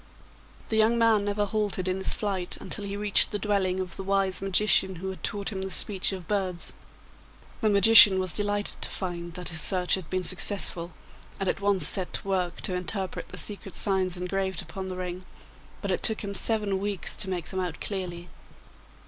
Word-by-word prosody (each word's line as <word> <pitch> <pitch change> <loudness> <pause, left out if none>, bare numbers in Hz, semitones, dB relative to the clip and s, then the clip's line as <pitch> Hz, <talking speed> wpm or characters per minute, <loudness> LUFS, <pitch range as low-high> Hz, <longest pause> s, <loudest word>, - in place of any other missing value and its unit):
The 220 - -1
young 220 +2 +3
man 225 -3 +3
never 205 0 -1
halted 205 -2 -2
in 185 0 -1
his 190 - 0
flight 190 -4 -2
until 205 - -1
he 200 0 -5
reached 205 -1 +3
the 205 - -2
dwelling 195 -2 -1
of 185 -2 -4
the 195 - -6
wise 195 -1 0
magician 195 -1 +2
who 190 +3 -6
had 190 - -11
taught 200 -1 -2
him 195 -3 -5
the 190 - -4
speech 190 +1 +4
of 185 -3 -8
birds. 190 -4 -3 0.9
The 220 - +2
magician 205 -1 +8
was 185 -3 -1
delighted 205 0 -1
to - - -2
find 175 -2 -6
that 180 -1 -5
his 160 -2 -1
search 180 0 +1
had 185 -5 -2
been 185 0 -2
successful, 180 -1 +2 0.5
and 195 - -2
at 195 - -2
once 200 -2 +3
set 190 -3 0
to - - -4
work 180 -3 -2
to 185 - -2
interpret 185 +1 -4
the - - -9
secret 200 -3 -2
signs 190 -3 +1
engraved 190 0 -3
upon 190 -1 -7
the 185 - -6
ring, 180 0 -6 0.6
but - - -2
it - - -1
took 220 -2 +2
him 200 -1 -5
seven 205 -2 0
weeks 200 -2 -2
to 190 - -3
make 175 -3 -4
them 190 - -4
out 180 -3 -4
clearly. 180 -3 -5
190 Hz, 200 wpm, -26 LUFS, 185-205 Hz, 0.9 s, magician